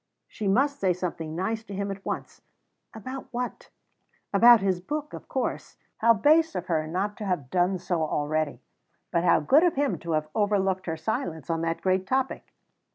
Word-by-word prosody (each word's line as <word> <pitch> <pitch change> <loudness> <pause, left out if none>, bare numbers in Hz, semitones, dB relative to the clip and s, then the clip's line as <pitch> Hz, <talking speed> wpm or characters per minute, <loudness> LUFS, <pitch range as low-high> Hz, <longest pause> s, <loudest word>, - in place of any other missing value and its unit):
She 210 - -5
must 280 +8 +2
say 185 -2 +2
something 165 -3 -4
nice 220 +5 -2
to 200 -3 -8
him 200 +1 -2
at 195 0 -7
once. - - -5 0.5
About 255 +5 -7
what? 245 0 -5 0.6
About 235 +3 +8
his 190 -2 0
book, 300 +8 -4
of - - -9
course. - - -3 0.2
How 230 +1 +5
base 310 +8 +4
of 180 -1 -3
her 160 -3 0
not 195 +5 -2
to 210 - -5
have 165 -10 -2
done 180 +1 +2
so 175 -2 -2
already! 155 -1 -1 0.5
but 170 - +1
how 175 - +5
good 275 - +5
of 350 -2 +3
him 280 0 0
to 170 -1 -3
have 155 0 0
overlooked 195 -3 +1
her 165 -1 -2
silence 160 -3 -3
on 165 0 -1
that 165 0 -2
great 185 0 +1
topic! 265 +2 -1
190 Hz, 185 wpm, -26 LUFS, 170-225 Hz, 0.6 s, About